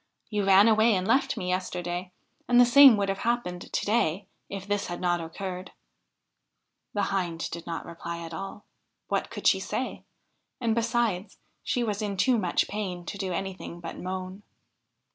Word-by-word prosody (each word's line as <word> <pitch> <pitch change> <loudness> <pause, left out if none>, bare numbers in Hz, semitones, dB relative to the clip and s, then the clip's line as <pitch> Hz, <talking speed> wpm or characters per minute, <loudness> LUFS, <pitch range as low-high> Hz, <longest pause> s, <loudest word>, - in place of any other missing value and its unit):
You 205 -2 0
ran 195 +2 +7
away 220 0 +5
and 185 0 -1
left 245 +1 +2
me 185 -4 -3
yesterday, 180 -1 -3 0.4
and 245 0 +5
the 245 - +9
same 260 -1 +8
would 200 -1 0
have 195 0 -2
happened 230 -7 -2
to - - -1
day 205 -4 +1 0.2
if 195 -1 -6
this 205 0 -1
had 175 - -5
not 175 -1 +1
occurred.' 180 +3 -6 1.2
The 205 -1 +1
Hind 175 -4 -1
did 170 0 -7
not 165 -1 -4
reply 170 0 -6
at 165 - -9
all; 195 +4 -7 0.4
what - - 0
could - - -8
she - - +5
say? - - -4 0.6
And 230 -3 +1
besides, 225 -4 0 0.3
she 245 - 0
was 210 -2 -2
in 205 -2 -2
too 245 +4 +3
much 180 -4 +1
pain 185 -4 -4
to 200 - -5
do 190 -2 -2
anything 185 -1 -5
but 170 -1 -7
moan. 185 +1 -5
195 Hz, 175 wpm, -27 LUFS, 180-215 Hz, 1.2 s, the